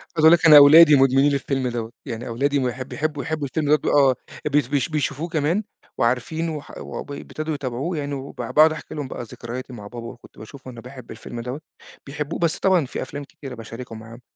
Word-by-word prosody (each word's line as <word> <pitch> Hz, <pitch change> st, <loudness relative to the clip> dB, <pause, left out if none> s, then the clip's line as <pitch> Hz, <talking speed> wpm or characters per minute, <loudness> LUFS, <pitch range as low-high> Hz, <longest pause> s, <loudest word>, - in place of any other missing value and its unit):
عايز 155 Hz, -, +3 dB
أقُول 160 Hz, -, +9 dB
لك 170 Hz, 0 st, +4 dB
أنا 155 Hz, -2 st, +10 dB
أولادي 150 Hz, +2 st, +9 dB
مدمنين 135 Hz, +1 st, +4 dB
للفيلم 135 Hz, -1 st, -1 dB
دوّة، 115 Hz, -2 st, -4 dB, 0.2 s
يعني 120 Hz, -1 st, -5 dB
أولادي 140 Hz, +5 st, 0 dB
بيحب 130 Hz, 0 st, -3 dB
بيحبّوا 150 Hz, -1 st, -3 dB
يحبوا 155 Hz, -3 st, -3 dB
الفيلم 150 Hz, +2 st, -2 dB
ده 150 Hz, -, +6 dB
ب -, -, -6 dB
آه 135 Hz, -3 st, +4 dB, 0.3 s
بي 150 Hz, +1 st, +3 dB
بيش 145 Hz, +1 st, 0 dB
بيشوفوه 150 Hz, +1 st, -2 dB
كمان 165 Hz, +4 st, 0 dB, 0.3 s
وعارفينه 155 Hz, +7 st, -1 dB
وح 145 Hz, -, -9 dB
وب -, -, -7 dB
ابتدوا 155 Hz, +2 st, -5 dB
يتابعوه 140 Hz, +4 st, -3 dB
يعني، 145 Hz, -1 st, -3 dB
وبع 135 Hz, 0 st, -6 dB
باقعد 155 Hz, +1 st, +6 dB
أحكي 155 Hz, -, -8 dB
لهم 145 Hz, -3 st, -4 dB
بقى 125 Hz, -, -6 dB
ذكرياتي 120 Hz, +3 st, -8 dB
مع 105 Hz, -4 st, -9 dB
بابا 120 Hz, +2 st, -8 dB
وكنت 120 Hz, 0 st, -14 dB
باشوفه 130 Hz, +4 st, -11 dB
إنه 120 Hz, -1 st, -11 dB
بيحب 125 Hz, 0 st, -11 dB
الفيلم 120 Hz, -, -8 dB
دوّة 125 Hz, +5 st, -6 dB, 0.4 s
بيحبّوه، 150 Hz, +2 st, -5 dB
بس 170 Hz, +1 st, 0 dB
طبعًا 185 Hz, -6 st, +3 dB
في -, -, -6 dB
أفلام 145 Hz, +2 st, -6 dB
كتيرة 135 Hz, -2 st, -10 dB
باشاركهم 115 Hz, 0 st, -9 dB
معاهم 115 Hz, +2 st, -12 dB
140 Hz, 205 wpm, -22 LUFS, 125-155 Hz, 0.4 s, أنا